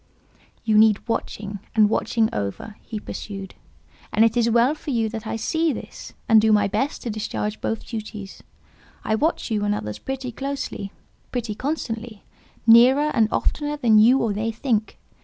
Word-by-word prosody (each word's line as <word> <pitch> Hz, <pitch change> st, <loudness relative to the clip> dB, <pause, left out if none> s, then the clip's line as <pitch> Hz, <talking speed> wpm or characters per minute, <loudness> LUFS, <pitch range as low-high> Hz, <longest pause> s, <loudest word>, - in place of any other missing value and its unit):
"You 215 Hz, -1 st, +4 dB
need 215 Hz, 0 st, +4 dB
watching, 205 Hz, -3 st, -3 dB, 0.2 s
and 215 Hz, -2 st, +6 dB
watching 220 Hz, +1 st, +1 dB
over," 105 Hz, -, -4 dB
he 220 Hz, -, -6 dB
pursued; 195 Hz, -2 st, -7 dB, 0.6 s
"and 220 Hz, -, +4 dB
it 230 Hz, +1 st, +1 dB
is 235 Hz, -1 st, +3 dB
well 235 Hz, +4 st, +4 dB
for 310 Hz, -1 st, -9 dB
you 230 Hz, -4 st, +1 dB
that 220 Hz, 0 st, -6 dB
I -, -, -2 dB
see 320 Hz, +8 st, 0 dB
this, -, -, -8 dB
and 220 Hz, -1 st, +6 dB
do 220 Hz, 0 st, +3 dB
my 205 Hz, -1 st, +4 dB
best 270 Hz, +8 st, -2 dB
to 235 Hz, -, -3 dB
discharge 210 Hz, 0 st, -3 dB
both 225 Hz, -, -3 dB
duties. 215 Hz, -3 st, -7 dB, 0.6 s
I 220 Hz, -, 0 dB
watch 295 Hz, +2 st, 0 dB
you 210 Hz, -2 st, 0 dB
and 205 Hz, 0 st, +1 dB
others 105 Hz, -, -5 dB
pretty 265 Hz, -1 st, -5 dB
closely, 270 Hz, -6 st, -5 dB, 0.4 s
pretty 235 Hz, -4 st, -3 dB
constantly, 230 Hz, -4 st, -4 dB, 0.4 s
nearer 255 Hz, +6 st, +6 dB
and 225 Hz, -4 st, +3 dB
oftener 295 Hz, 0 st, -1 dB
than 225 Hz, -6 st, +4 dB
you 240 Hz, +5 st, +6 dB
or 220 Hz, -3 st, 0 dB
they 220 Hz, +3 st, -2 dB
think. 225 Hz, -2 st, -1 dB
225 Hz, 170 wpm, -23 LUFS, 210-245 Hz, 0.6 s, and